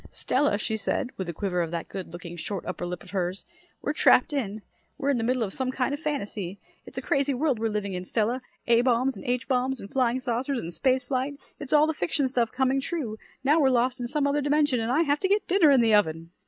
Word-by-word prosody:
"Stella," 275 Hz, -5 st, +1 dB
she 220 Hz, +1 st, -2 dB
said, 245 Hz, +4 st, -2 dB
with 190 Hz, -2 st, -4 dB
a -, -, -3 dB
quiver 180 Hz, 0 st, -1 dB
of 165 Hz, -, -2 dB
that 170 Hz, 0 st, -4 dB
good 190 Hz, -4 st, -7 dB
looking 175 Hz, 0 st, -8 dB
short 185 Hz, +2 st, -5 dB
upper 175 Hz, -, -4 dB
lip 175 Hz, -2 st, -5 dB
of -, -, -14 dB
hers, 185 Hz, -1 st, -2 dB, 0.4 s
"we're 295 Hz, -, 0 dB
trapped 290 Hz, -1 st, +4 dB
in. 215 Hz, -6 st, -2 dB, 0.3 s
We're 280 Hz, +1 st, +1 dB
in 255 Hz, -, +1 dB
the -, -, -1 dB
middle 250 Hz, 0 st, +1 dB
of 195 Hz, -3 st, -4 dB
some 260 Hz, -1 st, -2 dB
kind 260 Hz, +1 st, -1 dB
of 290 Hz, -, -3 dB
fantasy. 205 Hz, -, -3 dB, 0.3 s
It's 260 Hz, -, -12 dB
a 260 Hz, -, -3 dB
crazy 280 Hz, 0 st, +1 dB
world 270 Hz, -3 st, +1 dB
we're 225 Hz, 0 st, 0 dB
living 210 Hz, -2 st, -2 dB
in, 180 Hz, 0 st, -4 dB
Stella. 230 Hz, +6 st, 0 dB, 0.2 s
A 235 Hz, 0 st, +5 dB
bombs 255 Hz, +1 st, +2 dB
and -, -, -9 dB
H 245 Hz, -1 st, -1 dB
bombs 260 Hz, 0 st, 0 dB
and 200 Hz, -, -10 dB
flying 255 Hz, -1 st, +1 dB
saucers 255 Hz, +2 st, -1 dB
and 170 Hz, -6 st, -5 dB
space 255 Hz, +9 st, +1 dB
flight 270 Hz, +2 st, -2 dB, 0.2 s
it's 285 Hz, -3 st, -7 dB
all 300 Hz, 0 st, +6 dB
the 315 Hz, -, 0 dB
fiction 265 Hz, -, 0 dB
stuff 240 Hz, -3 st, 0 dB
coming 265 Hz, +1 st, +1 dB
true. 265 Hz, -9 st, -3 dB, 0.2 s
Now 295 Hz, +4 st, +4 dB
we're 275 Hz, -3 st, +4 dB
lost 255 Hz, +1 st, +1 dB
in 245 Hz, -, -3 dB
some 285 Hz, +3 st, 0 dB
other 285 Hz, +1 st, +1 dB
dimension, 290 Hz, -2 st, +2 dB
and 225 Hz, +1 st, -1 dB
I 310 Hz, +6 st, +3 dB
have 290 Hz, -1 st, +1 dB
to 380 Hz, -, +1 dB
get 410 Hz, +1 st, +2 dB
dinner 355 Hz, -4 st, +5 dB
in 270 Hz, -3 st, +6 dB
the 225 Hz, -2 st, +3 dB
oven." 165 Hz, -5 st, +2 dB
250 Hz, 250 wpm, -27 LUFS, 205-275 Hz, 0.4 s, all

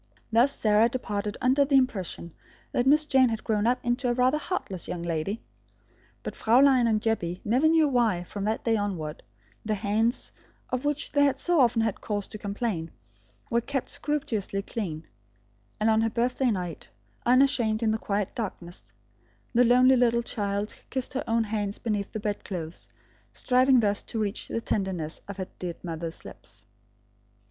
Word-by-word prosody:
Thus 240 Hz, +5 st, +4 dB
Sarah 215 Hz, +1 st, +4 dB
departed 210 Hz, -4 st, -3 dB
under 260 Hz, +3 st, +4 dB
the 280 Hz, 0 st, +1 dB
impression 190 Hz, -10 st, 0 dB, 0.4 s
that 245 Hz, -, +1 dB
Miss 300 Hz, +2 st, +5 dB
Jane 265 Hz, -4 st, +4 dB
had 225 Hz, -1 st, -3 dB
grown 215 Hz, 0 st, +1 dB
up 250 Hz, +1 st, +3 dB
into 245 Hz, +1 st, 0 dB
a -, -, +2 dB
rather 255 Hz, +4 st, +3 dB
a -, -, -7 dB
heartless 200 Hz, -, -4 dB
young 170 Hz, -1 st, -4 dB
lady. 170 Hz, +6 st, -2 dB, 0.8 s
But -, -, -5 dB
Fraulein 255 Hz, +1 st, +5 dB
and 220 Hz, -2 st, +2 dB
Jebbie 200 Hz, -6 st, -1 dB
never 255 Hz, +8 st, +3 dB
knew 320 Hz, -1 st, +4 dB
why, 230 Hz, -9 st, +2 dB
from 200 Hz, +3 st, -6 dB
that 220 Hz, +1 st, -1 dB
day 225 Hz, -1 st, +2 dB
onward, 180 Hz, -7 st, -3 dB, 0.4 s
the 215 Hz, 0 st, -1 dB
hands, 220 Hz, +4 st, 0 dB, 0.4 s
of 255 Hz, +2 st, -2 dB
which 295 Hz, 0 st, -1 dB
they 285 Hz, 0 st, +3 dB
had 275 Hz, -1 st, +1 dB
so 350 Hz, +3 st, +1 dB
often 235 Hz, -3 st, +4 dB
had 220 Hz, -3 st, -2 dB
cause 205 Hz, -2 st, -2 dB
to 215 Hz, -, -8 dB
complain, 200 Hz, -5 st, -3 dB, 0.6 s
were 235 Hz, 0 st, +3 dB
kept 270 Hz, +1 st, -3 dB
scrupulously 220 Hz, -9 st, -2 dB
clean; 165 Hz, -9 st, -5 dB, 0.7 s
and 215 Hz, -, +2 dB
on 220 Hz, 0 st, +4 dB
her 225 Hz, -, +2 dB
birthday 245 Hz, +3 st, +1 dB
night, 180 Hz, -6 st, -4 dB, 0.3 s
unashamed 245 Hz, -3 st, +3 dB
in 220 Hz, -, +3 dB
the 220 Hz, -, -1 dB
quiet 200 Hz, -2 st, -2 dB
darkness, 180 Hz, -6 st, -6 dB, 0.6 s
the 245 Hz, +1 st, +5 dB
lonely 250 Hz, +2 st, +6 dB
little 235 Hz, -1 st, +3 dB
child 205 Hz, -2 st, -2 dB, 0.2 s
kissed 260 Hz, -1 st, -3 dB
her 270 Hz, -, -2 dB
own 230 Hz, 0 st, +2 dB
hands 205 Hz, -2 st, -2 dB
beneath 210 Hz, -3 st, -2 dB
the 215 Hz, -, -4 dB
bedclothes, 185 Hz, -5 st, -5 dB, 0.5 s
striving 255 Hz, 0 st, +4 dB
thus 205 Hz, -1 st, +1 dB
to 225 Hz, -, -5 dB
reach 210 Hz, -1 st, -2 dB
the 230 Hz, -, -3 dB
tenderness 185 Hz, -8 st, -2 dB
of 200 Hz, -1 st, -7 dB
her 185 Hz, -1 st, -4 dB
dead 175 Hz, -2 st, -4 dB
mother's 165 Hz, -1 st, -5 dB
lips. -, -, -10 dB
225 Hz, 170 wpm, -27 LUFS, 200-250 Hz, 0.8 s, lonely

